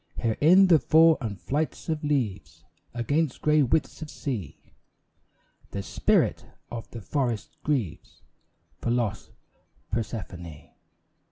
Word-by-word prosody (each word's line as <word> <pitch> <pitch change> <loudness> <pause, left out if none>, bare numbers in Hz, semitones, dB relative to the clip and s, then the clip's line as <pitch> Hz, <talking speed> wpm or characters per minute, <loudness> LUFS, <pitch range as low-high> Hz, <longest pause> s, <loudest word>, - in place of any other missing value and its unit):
Here 115 -2 0
in 180 +6 +7
the 170 -4 +6
fall 160 +1 +5
and 105 -6 -4
flights 140 - -2
of 155 -2 -2
leaves 95 - -2 0.3
Against 140 +4 -1
grey 150 0 +4
widths 135 +4 0
of 155 - -6
sea, 115 - -5 1.1
The 100 - -4
spirit - - +1 0.3
of 115 -1 -6
the 115 - -8
forests 120 -2 -2
grieves 130 - -3 0.6
For - - -2
lost 115 -5 -1 0.6
Persephone. 90 -8 -5
120 Hz, 115 wpm, -26 LUFS, 100-150 Hz, 1.1 s, in